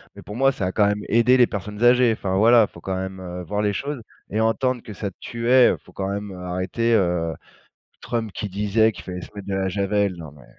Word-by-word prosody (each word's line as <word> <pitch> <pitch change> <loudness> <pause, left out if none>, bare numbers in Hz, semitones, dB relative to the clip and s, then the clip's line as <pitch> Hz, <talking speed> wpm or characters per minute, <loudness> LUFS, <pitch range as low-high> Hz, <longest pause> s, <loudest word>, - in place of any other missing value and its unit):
mais - - -11
pour 105 - -9
moi, 135 +1 +4
ça 105 -8 -3
a - - -2
quand 105 +1 +3
même 105 0 -1
aider 120 +3 +4
les 125 -2 +5
personnes 105 +2 -5
âgées. 120 -1 +5
Enfin, 95 -3 -3
voilà, 115 +2 +6
il - - -32
faut - - -12
quand 95 - -3
même, 95 0 -5
heu, 90 0 -6
voir 105 +5 -2
les 105 -1 +1
choses 140 +4 -4 0.3
et 105 - -2
entendre 125 +2 +1
que 105 - -9
ça 100 +1 -4
tuait, 120 +2 +3
heu, - - -2
faut - - -17
quand 95 0 -3
même, 100 0 -4
heu, 95 - -9
arrêter, 95 +6 -1
heu, 85 -5 +1 0.7
Trump 115 -3 -3
qui 105 +3 -4
disait 105 +3 +2
qu'il - - -11
fallait 90 -1 -6
se - - -10
mettre 100 -1 -8
de 100 - -2
la 95 0 0
javel, 100 +1 0
non 80 -3 -9
mais 70 -4 -17
105 Hz, 255 wpm, -23 LUFS, 95-115 Hz, 0.7 s, voilà